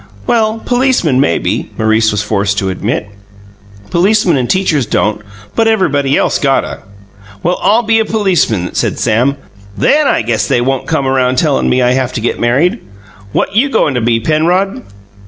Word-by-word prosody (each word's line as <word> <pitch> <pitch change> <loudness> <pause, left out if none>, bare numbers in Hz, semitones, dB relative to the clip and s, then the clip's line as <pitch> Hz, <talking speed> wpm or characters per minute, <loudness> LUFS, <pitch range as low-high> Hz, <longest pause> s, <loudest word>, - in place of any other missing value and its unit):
"Well, 225 -1 +1
policemen, 245 - +1
maybe," 110 -11 0
Maurice 110 0 +2
was 105 0 -1
forced 100 -1 -1
to 95 -1 -1
admit. 100 +3 -3 0.8
"Policemen 190 -1 +2
and 125 -3 -1
teachers 160 - +1
don't, 105 0 0 0.3
but 225 - +2
everybody 145 -11 +1
else - - 0
gotta." 135 -2 0 0.6
"Well, 175 +1 0
I'll 225 +4 +3
be 225 0 +2
a - - +2
policeman," 180 - 0
said - - -1
Sam. 120 +5 +1 0.4
"THEN 295 0 +2
I - - +1
guess 115 -1 -1
they - - +1
won't 130 +1 -1
come 160 -4 -1
around 130 -1 +1
tellin' 150 0 +1
me 125 0 +2
I 125 - +2
have 130 -1 -1
to - - -3
get 120 - -2
married. 145 - +1 0.5
What 195 - -1
you 265 +6 +3
goin' 145 - +1
to 125 - -1
be, 115 0 +1
Penrod?" 170 - 0
135 Hz, 170 wpm, -13 LUFS, 115-195 Hz, 0.8 s, I'll